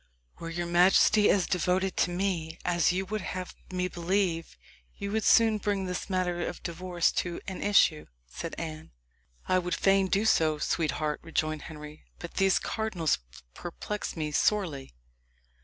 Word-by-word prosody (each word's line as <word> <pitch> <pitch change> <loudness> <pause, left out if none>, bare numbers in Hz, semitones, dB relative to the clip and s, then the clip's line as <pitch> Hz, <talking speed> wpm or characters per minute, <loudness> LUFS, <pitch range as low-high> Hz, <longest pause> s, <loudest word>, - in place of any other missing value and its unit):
"Were 165 - -6
your 175 +1 -3
majesty 185 +4 +5
as 190 -3 +3
devoted 185 +1 0
to - - +2
me 175 -3 -2
as 175 -1 +3
you 190 +2 -1
would 215 +2 -3
have 185 0 -5 0.2
me 180 0 -1
believe, 175 -1 -1 0.4
you 200 - -4
would 220 0 0
soon 220 0 +5
bring 200 -2 -1
this 180 +2 -4
matter 180 -2 0
of - - -3
the - - -17
divorce 175 0 0
to 175 -1 -5
an 190 - -5
issue," 190 -6 +3 0.2
said - - -6
Anne. 155 - -7 0.5
"I 185 - +3
would 180 0 -2
fain 195 0 +3
do 200 +3 +1
so, 160 -7 +3
sweetheart," 155 -1 -1
rejoined 155 -2 -2
Henry; 150 -1 -10
"but 170 - -8
these 195 -1 +4
cardinals 195 -8 -1 0.3
perplex 205 - -5
me 155 -1 -2
sorely." 150 - 0
180 Hz, 155 wpm, -28 LUFS, 165-195 Hz, 0.5 s, majesty